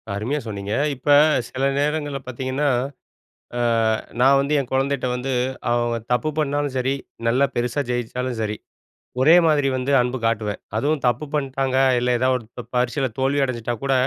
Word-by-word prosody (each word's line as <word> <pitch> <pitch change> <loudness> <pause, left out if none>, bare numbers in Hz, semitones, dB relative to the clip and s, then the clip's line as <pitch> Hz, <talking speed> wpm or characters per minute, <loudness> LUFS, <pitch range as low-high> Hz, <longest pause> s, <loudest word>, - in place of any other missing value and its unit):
அருமையா 120 +9 -2
சொன்னீங்க. 100 -1 -4 0.2
இப்ப 130 +3 -18 0.4
சில 130 +1 -4 0.2
நேரங்கள்ல 145 -1 -1
பார்த்தீங்கன்னா, 130 +3 -2 0.9
அ - - 0 0.6
நான் 135 +2 +6
வந்து 140 +2 -1
என் 130 -3 -4
கொழந்தைட்ட 135 -1 0
வந்து, 125 +2 -3 0.4
அவங்க 120 0 +1 0.2
தப்பு 140 +5 0
பண்ணாலும் 145 -2 -1
சரி, 130 +1 +1 0.3
நல்லா 125 +4 +3
பெருசா 120 +4 0
ஜெயிச்சாலும் 125 0 -2
சரி, 105 -1 -2 0.7
ஒரே 155 +6 +7
மாதிரி 145 -3 +3
வந்து 130 +2 -1
அன்பு 125 +1 -1
காட்டுவேன். 110 -3 -1 0.2
அதுவும் 145 +4 0
தப்பு 125 +5 0
பண்ட்டாங்க. 135 -2 -1 0.2
இல்ல, 125 +1 0
ஏதாவது 130 +1 +2
ஒரு 115 - -13
ப 125 - -5
பரிட்சைல 125 +2 +1
தோல்வி 135 +2 +1
அடைஞ்சிட்டா 120 -2 -3
கூட, 135 - +1
130 Hz, 155 wpm, -22 LUFS, 120-140 Hz, 0.9 s, ஒரே